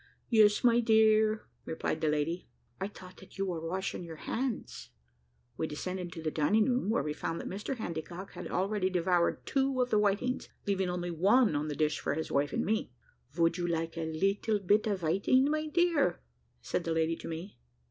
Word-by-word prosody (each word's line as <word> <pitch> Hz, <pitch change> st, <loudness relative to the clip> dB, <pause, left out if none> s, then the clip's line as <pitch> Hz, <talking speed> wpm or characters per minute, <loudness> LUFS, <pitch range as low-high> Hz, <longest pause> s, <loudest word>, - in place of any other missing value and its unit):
"Yes, 215 Hz, -3 st, +5 dB
my 240 Hz, -1 st, +5 dB
dear," 220 Hz, -1 st, +4 dB, 0.2 s
replied 160 Hz, -, -3 dB
the 160 Hz, -, +1 dB
lady; 150 Hz, +4 st, -1 dB, 0.3 s
"I 190 Hz, -, -1 dB
thought 185 Hz, -2 st, -13 dB
that 190 Hz, -, -15 dB
you 195 Hz, -, 0 dB
were 175 Hz, -4 st, -3 dB
washing 180 Hz, +3 st, -3 dB
your 165 Hz, -1 st, -8 dB
hands." 240 Hz, -, -4 dB, 0.7 s
We 160 Hz, -, -1 dB
descended 180 Hz, +4 st, -4 dB
into 170 Hz, -2 st, -8 dB
the 155 Hz, -, -1 dB
dining 205 Hz, +9 st, +3 dB
room, 250 Hz, -4 st, +1 dB
where 220 Hz, -, +2 dB
we 150 Hz, 0 st, -2 dB
found 165 Hz, +2 st, -3 dB
that -, -, -6 dB
Mr 205 Hz, +8 st, -4 dB
Handycock 175 Hz, -2 st, -6 dB
had -, -, -7 dB
already 190 Hz, 0 st, 0 dB
devoured 180 Hz, -1 st, +1 dB
two 270 Hz, -1 st, +1 dB
of 250 Hz, 0 st, +1 dB
the 215 Hz, -, +4 dB
whitings, 210 Hz, +5 st, 0 dB, 0.2 s
leaving 195 Hz, -2 st, 0 dB
only 175 Hz, 0 st, -2 dB
one 195 Hz, -, +4 dB
on 145 Hz, +1 st, -1 dB
the 150 Hz, -, -3 dB
dish 150 Hz, 0 st, +1 dB
for -, -, -1 dB
his 160 Hz, -, -4 dB
wife 140 Hz, +1 st, +1 dB
and -, -, -1 dB
me. 215 Hz, -, -1 dB, 0.4 s
"Vould 165 Hz, +2 st, +2 dB
you 175 Hz, -, 0 dB
like 165 Hz, -1 st, -2 dB
a 160 Hz, -1 st, -3 dB
little 195 Hz, +6 st, +1 dB
bit 205 Hz, +3 st, +2 dB
of 200 Hz, -3 st, -1 dB
viting, 195 Hz, -, +3 dB
my 310 Hz, 0 st, -1 dB
dear?" 320 Hz, -, +2 dB, 0.4 s
said 170 Hz, -, -1 dB
the 165 Hz, -, -1 dB
lady 160 Hz, 0 st, +1 dB
to -, -, -8 dB
me. 165 Hz, +5 st, -7 dB
185 Hz, 200 wpm, -31 LUFS, 165-215 Hz, 0.7 s, Yes